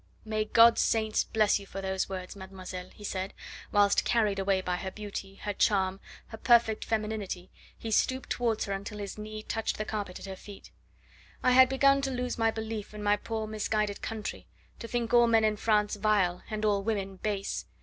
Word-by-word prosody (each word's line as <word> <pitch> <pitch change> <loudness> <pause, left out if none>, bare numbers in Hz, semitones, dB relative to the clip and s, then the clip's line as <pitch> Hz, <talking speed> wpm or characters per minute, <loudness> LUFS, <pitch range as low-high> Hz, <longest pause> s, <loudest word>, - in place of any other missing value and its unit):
"May 215 0 -1
God's 230 +2 +6
saints 220 -1 +2
bless 215 -2 +2
you 200 - -11
for 195 - -6
those 190 -1 -2
words, 185 -1 -6
mademoiselle," 185 -1 -8
he 210 - -15
said, 190 -1 -4 0.4
whilst, 205 -1 +4
carried 215 -4 +1
away 195 0 +2
by 180 -1 -1
her 190 - -4
beauty, 200 -1 -7
her 205 +1 -4
charm, 190 -2 +2 0.3
her 220 - -8
perfect 235 -3 +4
femininity, 210 -4 -3 0.3
he 225 - -6
stooped 260 +4 +1
towards 230 -3 0
her 200 - -3
until 200 +2 -5
his 205 0 -6
knee 215 0 -6
touched 225 0 -2
the 215 - -3
carpet 205 -4 -4
at - - -9
her 190 -1 -6
feet. 200 +1 -12 0.7
"I 255 - +4
had 260 0 +7
begun 275 +1 +4
to 275 - -1
lose 250 -2 -3
my 225 0 +4
belief 220 -1 -5
in 210 - -6
my 205 0 +4
poor 220 +1 -4
misguided 215 -1 -1
country, 220 -1 -5 0.3
to 230 - -6
think 235 0 -2
all 240 0 +7
men 225 -1 +4
in 215 -1 +2
France 210 -1 +1
vile, 200 -4 +2
and 215 -1 -2
all 205 -2 +2
women 195 -2 -2
base. 200 0 -3
210 Hz, 195 wpm, -29 LUFS, 195-225 Hz, 0.7 s, had